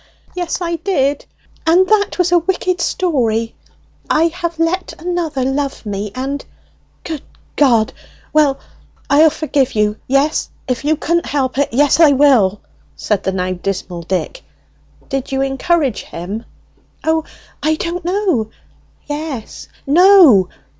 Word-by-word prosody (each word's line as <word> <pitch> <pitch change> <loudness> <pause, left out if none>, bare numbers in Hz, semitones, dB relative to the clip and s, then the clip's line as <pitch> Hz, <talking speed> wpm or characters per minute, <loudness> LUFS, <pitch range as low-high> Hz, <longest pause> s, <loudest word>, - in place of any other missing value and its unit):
"Yes, 355 0 -3
I 340 -1 -1
did; 290 -6 -1 0.4
and 360 +3 +5
that 425 -2 +2
was 360 -1 +1
a 350 - +5
wicked 365 +1 -1
story! 230 -13 0 0.6
I 330 +2 +3
have 340 -1 -4
let 335 +3 -1
another 335 -5 -2
love 275 -1 -2
me, 205 0 -4
and 275 +2 -3 0.3
" - - -38
"Good 315 -4 -5 0.3
G! 240 -7 +4 0.5
Well, 295 -3 +3 0.5
I'll 310 +3 +6
forgive 295 -4 -1
you, 210 0 +1
yes, 275 +4 +1 0.2
if 250 -1 -2
you 305 +2 +2
couldn't 340 +3 -1
help 270 -2 -1
it, 285 - +2
yes, 285 +6 +3
I 310 -4 +7
will!" 250 -9 +4 0.3
said 210 -2 -1
the 190 - -1
now 185 -1 -2
dismal 180 -1 -4
Dick. 190 - -3 0.7
"Did 270 -1 -3
you 270 0 0
encourage 275 - 0
him?" 195 +7 -7 0.6
"O, 320 0 +1 0.4
I 315 +1 +2
don't 340 +2 -4
know, 355 - 0 0.6
yes 290 -6 -6 0.2
no. 310 - +6
290 Hz, 135 wpm, -17 LUFS, 240-340 Hz, 0.7 s, I